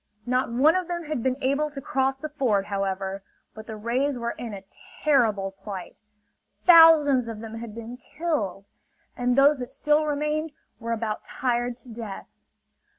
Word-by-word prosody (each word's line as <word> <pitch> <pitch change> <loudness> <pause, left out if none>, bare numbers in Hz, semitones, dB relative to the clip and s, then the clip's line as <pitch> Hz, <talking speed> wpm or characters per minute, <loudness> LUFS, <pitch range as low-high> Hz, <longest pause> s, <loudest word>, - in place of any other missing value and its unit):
Not 250 0 0
one 285 +8 +4
of 370 -2 -1
them 345 -1 -3
had 300 -5 -3
been 255 +1 0
able 280 +3 +1
to 290 -2 -8
cross 265 0 0
the 310 +3 -6
ford, 240 -10 0
however. 195 -1 -3 0.3
But 220 0 -11
the 220 - -6
rays 250 +6 -1
were 235 0 -2
in 235 -2 -7
a 195 -2 -8 0.4
terrible 220 -10 +2
plight. 195 -2 -9 0.6
Thousands 315 -7 +7
of 225 -2 -6
them 225 0 -8
had 230 -2 -8
been 230 +2 -8
killed; 255 - -3 0.5
and 245 0 +1
those 280 +2 +5
that 250 -1 -6
still 300 +1 +1
remained 300 +1 -1 0.3
were 230 -1 -4
about 220 -2 -2
tired 240 -1 -2
to - - -13
death. 220 -4 -7
245 Hz, 165 wpm, -25 LUFS, 220-295 Hz, 0.6 s, Thousands